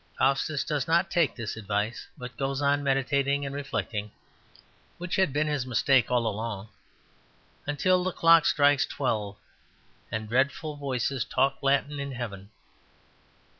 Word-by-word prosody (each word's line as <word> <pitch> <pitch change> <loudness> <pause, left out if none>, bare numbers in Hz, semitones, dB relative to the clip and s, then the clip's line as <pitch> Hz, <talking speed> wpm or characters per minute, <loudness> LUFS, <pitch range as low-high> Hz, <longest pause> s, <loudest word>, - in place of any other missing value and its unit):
Faustus 140 +2 +1
does 145 -4 -2
not 170 +4 +2
take 170 -6 +2
this 115 -3 -5
advice, 105 +1 -3
but 125 -2 -8
goes 135 +2 -2
on 145 0 +2
meditating 140 +1 +1
and 140 - -5
reflecting 115 -7 -3 0.9
(which 180 0 -3
had 190 -6 +2
been 150 +3 +1
his 145 -4 -1
mistake 130 0 +3
all 120 -2 +1
along) 110 -1 -3 1.0
until 180 +6 +2
the 185 - -1
clock 165 -1 +5
strikes 145 -2 +4
twelve, 105 -7 -2 0.7
and 110 0 -3
dreadful 140 +6 0
voices 135 -3 -2
talk 135 +3 +1
Latin 140 +1 +1
in 140 -1 -4
heaven. 100 -5 -6
135 Hz, 135 wpm, -27 LUFS, 115-145 Hz, 1.0 s, clock